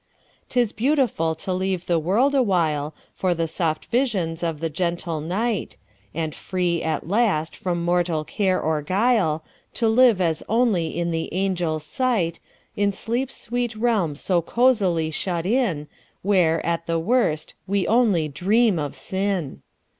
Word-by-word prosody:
'T 250 - 0
is 235 -4 +2
beautiful 240 - +1
to 185 +4 -4
leave 185 -1 -1
the 170 -2 +2
world 215 - +2
awhileFor 175 - 0
the 165 0 0
soft 160 -1 -1
visions 200 -10 0
of 165 -3 -2
the 165 - -1
gentle 170 0 -2
night; 205 +7 -2 0.3
And 160 -1 -3
free, 180 -3 -1
at 160 -1 -2
last, 190 -6 +1
from 175 -2 -2
mortal 175 -3 +1
care 190 -1 0
or 155 -1 0
guile, 185 -3 +1 0.3
To 230 - +1
live 230 -2 +5
as 165 -3 0
only 215 -9 +1
in 170 0 -1
the 165 0 -3
angels' 175 -4 -1
sight, 180 - 0 0.4
In 205 0 +2
sleep's 240 +6 -3
sweet 240 0 -2
realm 215 -9 +1
so 175 +4 +1
cosily 190 -7 +2
shut 170 +1 -2
in, 195 - 0 0.4
Where, 175 -5 +2
at 170 0 -1
the 165 0 +1
worst, 165 -5 +1
we 200 -1 +1
only 215 -9 +3
dream 195 - +2
of 145 -2 -4
sin! 190 -6 -2
180 Hz, 145 wpm, -23 LUFS, 165-220 Hz, 0.4 s, live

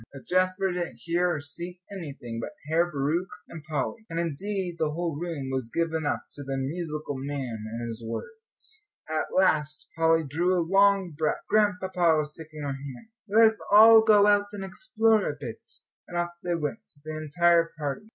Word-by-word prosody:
But 135 - -12
Jasper 185 +1 +1
didn't 175 -1 -4
hear 175 +1 +1
or 155 - -2
see 170 +5 -8
anything 140 -11 -6
but 150 +6 -6
Herr 170 +3 +2
Bauricke 155 +6 -1 0.2
and 160 -3 -10
Polly; 155 - -3
and, 165 0 -3
indeed, 175 +2 -3
the 155 - +1
whole 165 0 -2
room 150 -4 -4
was 130 -3 -2
given 160 -2 -1
up 145 - -1
to 145 - -8
the 135 0 -3
"musical 150 +1 -3
man" 130 -6 -4
and 120 +1 -4
his 115 0 -7
words. 440 - -8 0.2
At 155 0 -1
last 155 -5 +1
Polly 165 0 +3
drew 175 +6 +1
a 170 - 0
long 195 -1 +4
breath; 155 0 -1
Grandpapa 185 -5 +2
was 150 0 -2
taking 155 -2 -9
her 145 - -2
hand. 135 - -9 0.2
"Let 225 +3 +6
us 220 0 +2
all 220 +2 +9
go 210 -2 +6
out 205 0 +4
and 195 -2 -5
explore 220 - +1
a - - -5
bit," - - -7 0.5
and 175 - -5
off 175 0 -1
they 175 -1 0
went, 150 -3 -3 0.3
the 155 0 -5
entire 165 +2 +3
party. 155 +8 -4
165 Hz, 180 wpm, -27 LUFS, 145-190 Hz, 0.5 s, all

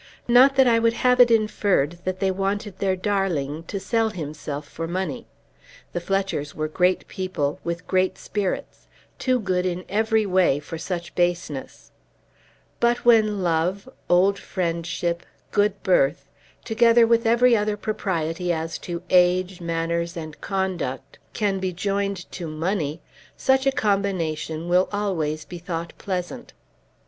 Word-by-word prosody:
Not 255 +3 +6
that 265 -1 +6
I 230 -1 +4
would 230 0 +3
have 250 0 +5
it 245 -1 +8
inferred 205 -8 +1
that 185 0 -2
they 190 0 +1
wanted 195 +1 -2
their 190 -1 +1
darling 180 -7 -1
to 200 - -4
sell 225 +2 +1
himself 150 -5 -6
for 165 +3 -5
money. 175 -3 -3 0.7
The 175 - -2
Fletchers 195 -5 -2
were 155 0 -2
great 180 +4 +1
people, 175 -7 -2
with 170 0 -4
great 185 0 +1
spirits, 200 -3 -4 0.3
too 255 -1 +1
good 185 -4 0
in 180 0 -3
every 220 +1 +1
way 185 -7 +3
for 160 +2 -7
such 175 0 -4
baseness. 175 -6 -2 0.9
But 240 0 +1
when 215 -4 +4
love, 175 +5 0 0.2
old 190 +3 +4
friendship, 170 -1 -2 0.3
good 205 +1 +1
birth, - - +2 0.4
together 230 +1 +5
with 230 0 +2
every 240 +1 +5
other 210 -1 0
propriety 180 -5 -2
as 160 -1 -3
to 170 -1 -6
age, 180 0 +3
manners, 170 0 -2
and 155 -2 -8
conduct, 185 -9 -3
can 200 -3 0
be 185 -1 -1
joined 200 +1 -2
to 175 -3 -6
money, 160 0 -2 0.4
such 265 0 +2
a - - +5
combination 175 -8 -1
will 180 +1 +3
always 165 -7 -2
be 175 - -8
thought 170 -1 -5
pleasant. 180 -3 -4
185 Hz, 140 wpm, -24 LUFS, 170-210 Hz, 0.9 s, it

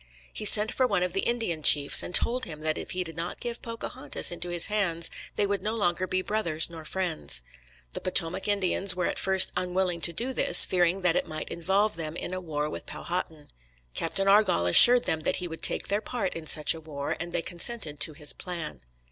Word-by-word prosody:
He 215 - -4
sent 210 +1 +4
for 255 - 0
one 200 -6 -1
of 180 -1 -4
the 195 - -1
Indian 225 -10 -3
chiefs, 145 -1 +6
and 180 - -3
told 250 +2 +3
him 155 -2 -10
that 155 0 -1
if - - -8
he 185 0 -2
did 165 -2 -10
not 170 +1 -6
give 240 -1 -6
Pocahontas 230 - -2
into 175 0 -6
his 175 -1 +3
hands 170 -6 -1 0.2
they 205 - 0
would 200 -1 -3
no 215 +3 -4
longer 185 -3 -1
be 185 0 -2
"brothers 170 -7 0
nor 160 -2 -11
friends." 170 - -2 0.5
The - - -7
Potomac 185 +1 0
Indians 195 -2 +2
were 180 -1 -2
at - - -3
first 190 -1 +4
unwilling 180 -1 -2
to 170 - +5
do 240 +10 -5
this, - - +7
fearing 180 +1 0
that 180 -2 0
it - - -2
might 155 -1 -7
involve 195 +3 -1
them 160 -1 -6
in 175 - -6
a 185 - -5
war 150 -3 -4
with - - -9
Powhatan. 160 -4 -6 0.4
Captain 195 - -2
Argall 195 - +2
assured 240 - +8
them 160 - -2
that 155 - -2
he 180 - -4
would 165 -1 -10
take - - +2
their 205 +1 -2
part 220 -7 -4
in 165 -1 -9
such 150 0 +3
a 165 - -11
war, 145 -3 -6
and 175 0 -7
they 165 - -3
consented 170 -4 -2
to 155 - -1
his 150 -1 -4
plan. 170 - -7
180 Hz, 220 wpm, -26 LUFS, 160-200 Hz, 0.5 s, assured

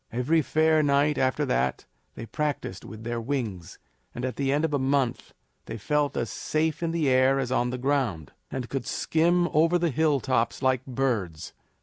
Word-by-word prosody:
Every 135 +8 +2
fair 155 +1 +3
night 145 0 +2
after 130 +3 +1
that 125 - -1 0.3
they 115 - -7
practiced 145 -8 -3
with 110 0 -10
their 120 0 -3
wings, 115 - -4 0.4
and 120 - -3
at 130 - -3
the 135 -1 0
end 150 +3 +2
of 155 - -3
a 145 - +1
month 130 -2 -1 0.3
they 115 - -5
felt 145 +6 0
as 120 - -2
safe 155 0 -1
in 165 - 0
the 165 -3 0
air 130 +1 +4
as 130 -2 -2
on 125 -1 +1
the 125 - -3
ground, 125 - -1 0.2
and 130 -2 -4
could 135 -1 -4
skim 175 +2 +2
over 165 +3 +3
the 170 -2 0
hilltops 135 -5 +1
like 130 -1 +2
birds. 115 -11 -2
135 Hz, 185 wpm, -26 LUFS, 120-150 Hz, 0.4 s, air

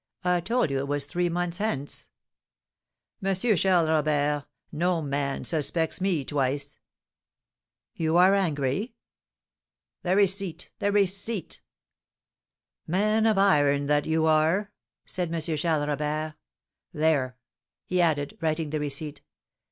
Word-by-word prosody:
I 180 -1 +2
told 230 - 0
you 135 - 0
it 140 - -3
was 145 0 -1
three 175 +3 -1
months 175 0 -2
hence." 200 -10 -3 1.1
"Monsieur 195 +3 +2
Charles 180 -2 +3
Robert, 150 -2 +1 0.2
no 175 +2 +1
man 140 -2 -2
suspects 160 +2 -1
me 180 -8 0
twice." 140 0 -2 1.1
"You 160 +1 +1
are 185 +2 +6
angry?" 185 - 0 1.1
"The 180 +1 +1
receipt, 195 -3 +1
the 205 - +1
receipt!" 200 -1 0 1.3
"Man 215 +5 +2
of 215 -2 +2
iron, 145 -8 +3
that 145 0 +1
you 160 0 +2
are!" 160 +6 +2 0.3
said 180 -3 -2
M. 170 - -1
Charles 155 -1 0
Robert. 150 +1 -2 0.6
"There!" 145 -5 +1 0.5
he 180 0 +1
added, 145 -4 0
writing 155 -1 -1
the 155 - -1
receipt. 145 +1 -3
160 Hz, 120 wpm, -26 LUFS, 145-185 Hz, 1.3 s, are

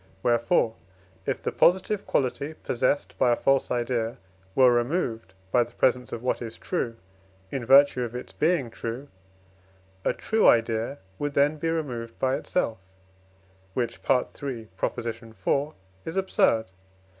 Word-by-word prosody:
Wherefore, 120 -1 +2 0.5
if - - -2
the - - -1
positive 190 +3 +2
quality 140 +3 -1
possessed 135 +2 -1
by 125 - +4
a - - +4
false 135 +2 +2
idea 120 -2 -1 0.4
were 130 -2 +6
removed 120 - -1 0.2
by 125 - +5
the 120 0 -13
presence 125 0 +2
of 115 - -5
what 125 - 0
is 115 -1 -6
true, 125 -10 -2 0.6
in 135 - -3
virtue 135 -1 +6
of 120 -1 -3
its 125 - -6
being 155 -7 +1
true, 120 +6 -6 0.9
a - - +2
true 220 0 +2
idea 115 +3 +3 0.2
would 145 -1 -2
then 145 +2 +3
be 165 +2 -1
removed 125 -8 -3
by 130 0 +1
itself, 115 - -1 1.0
which 120 -2 -2
(IV. 130 -2 +2
iii.) 120 -6 -4 1.3
is 165 +3 -5
absurd. 115 -11 +3
125 Hz, 135 wpm, -26 LUFS, 115-145 Hz, 1.3 s, were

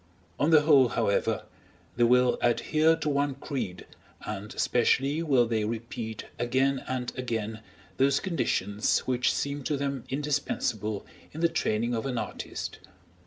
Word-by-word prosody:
On 145 - +3
the 155 -2 +7
whole, 140 -5 +5
however, 100 - 0 0.5
they 120 - +4
will 125 +1 +4
adhere 155 +7 +3
to 160 - -4
one 140 -1 +1
creed, 130 -10 -5 0.4
and 105 0 -5
especially 135 +5 +2
will 135 -7 +3
they 115 -2 0
repeat 110 0 -4 0.2
again 130 +3 +1
and 125 -1 -3
again 110 -3 -3 0.4
those 140 +1 +3
conditions 105 - 0
which 125 -1 +2
seem 140 0 -2
to 150 - 0
them 140 -3 -2
indispensable 130 -7 -2 0.3
in 160 - -6
the 170 - +4
training 115 -2 0
of 115 +3 -2
an 125 -2 -2
artist. - - -5
125 Hz, 140 wpm, -28 LUFS, 115-140 Hz, 0.5 s, the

